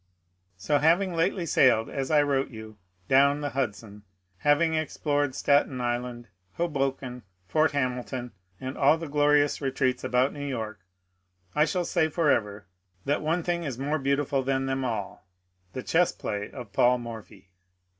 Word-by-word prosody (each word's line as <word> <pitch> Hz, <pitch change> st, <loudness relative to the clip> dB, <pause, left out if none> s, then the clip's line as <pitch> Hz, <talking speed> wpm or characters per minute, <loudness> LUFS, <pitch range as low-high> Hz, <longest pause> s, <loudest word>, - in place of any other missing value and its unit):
So 145 Hz, +10 st, +1 dB
having 175 Hz, +5 st, +3 dB
lately 170 Hz, +2 st, 0 dB
sailed, 125 Hz, -7 st, +4 dB
as 135 Hz, -1 st, -4 dB
I 150 Hz, -2 st, +4 dB
wrote 140 Hz, -1 st, 0 dB
you, 110 Hz, -2 st, -10 dB, 0.3 s
down 140 Hz, +2 st, +4 dB
the 145 Hz, -1 st, -3 dB
Hudson, 105 Hz, -5 st, -4 dB, 0.4 s
having 150 Hz, +6 st, +3 dB
explored 145 Hz, -3 st, -1 dB
Staten 140 Hz, -3 st, +2 dB
Island, 120 Hz, 0 st, -3 dB, 0.3 s
Hoboken, 135 Hz, -5 st, -2 dB, 0.2 s
Fort 155 Hz, -, +2 dB
Hamilton, 125 Hz, -2 st, -2 dB, 0.3 s
and 130 Hz, +1 st, -5 dB
all 145 Hz, +3 st, +4 dB
the 165 Hz, 0 st, -6 dB
glorious 145 Hz, 0 st, +2 dB
retreats 130 Hz, -2 st, 0 dB
about 125 Hz, +2 st, +1 dB
New 145 Hz, -, -6 dB
York, 110 Hz, -6 st, -4 dB, 0.7 s
I 150 Hz, -, +4 dB
shall 175 Hz, +3 st, -1 dB
say 160 Hz, -2 st, +1 dB
forever 110 Hz, -, 0 dB, 0.4 s
that 145 Hz, -, 0 dB
one 165 Hz, +3 st, 0 dB
thing 175 Hz, 0 st, -1 dB
is 135 Hz, -6 st, -4 dB
more 145 Hz, +4 st, -1 dB
beautiful 140 Hz, 0 st, 0 dB
than 135 Hz, 0 st, 0 dB
them 135 Hz, 0 st, -1 dB
all, 105 Hz, -6 st, -4 dB, 0.2 s
— 90 Hz, 0 st, -41 dB
the 130 Hz, -, -5 dB
chess 175 Hz, +1 st, +2 dB
play 105 Hz, 0 st, -4 dB
of 120 Hz, -7 st, -10 dB
Paid 125 Hz, +4 st, +4 dB
Morphy. 110 Hz, -5 st, -10 dB
135 Hz, 155 wpm, -27 LUFS, 120-150 Hz, 0.7 s, sailed